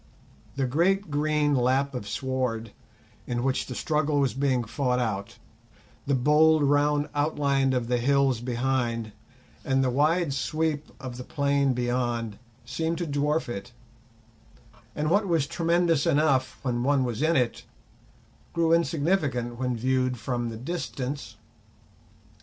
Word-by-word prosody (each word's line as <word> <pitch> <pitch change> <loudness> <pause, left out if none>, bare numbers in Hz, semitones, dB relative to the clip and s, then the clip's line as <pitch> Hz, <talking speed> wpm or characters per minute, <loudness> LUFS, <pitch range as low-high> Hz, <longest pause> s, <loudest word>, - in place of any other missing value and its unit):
The 135 -1 0
great 175 +7 +1
green 150 0 +1
lap 135 +2 +2
of 125 -5 -5
sward 115 -1 -2 0.6
in 120 0 -2
which 135 0 0
the 125 - -6
struggle 150 0 0
was 135 -2 +1
being 130 -2 +1
fought 125 +3 -1
out, 105 -5 -3 0.7
the 140 - +2
bold 150 +4 +4
round 145 +1 +2
outline 140 -2 +1
of 125 -2 -1
the 125 0 +1
hills 135 -1 +2
behind, 120 -2 -1 0.5
and 135 0 +1
the 130 - +1
wide 155 +3 +2
sweep 155 +2 -2
of 125 -2 -7
the 125 - -6
plain 140 -1 +1
beyond, 120 -3 -2 0.3
seemed 160 +7 -2
to 175 - -2
dwarf 150 +1 0
it; 120 -1 -6 1.2
and 150 +1 -1
what 200 +2 +3
was 165 -5 +2
tremendous 170 -1 +1
enough 135 -6 +2
when 120 -2 -1
one 135 +1 +2
was 120 -1 -3
in 160 +2 +3
it, 125 -3 0 0.9
grew 165 -1 +2
insignificant 145 -7 0
when 125 -2 -1
viewed 130 +1 0
from 120 0 -2
the 115 - -6
distance. 135 -4 -5
135 Hz, 135 wpm, -26 LUFS, 125-150 Hz, 1.2 s, bold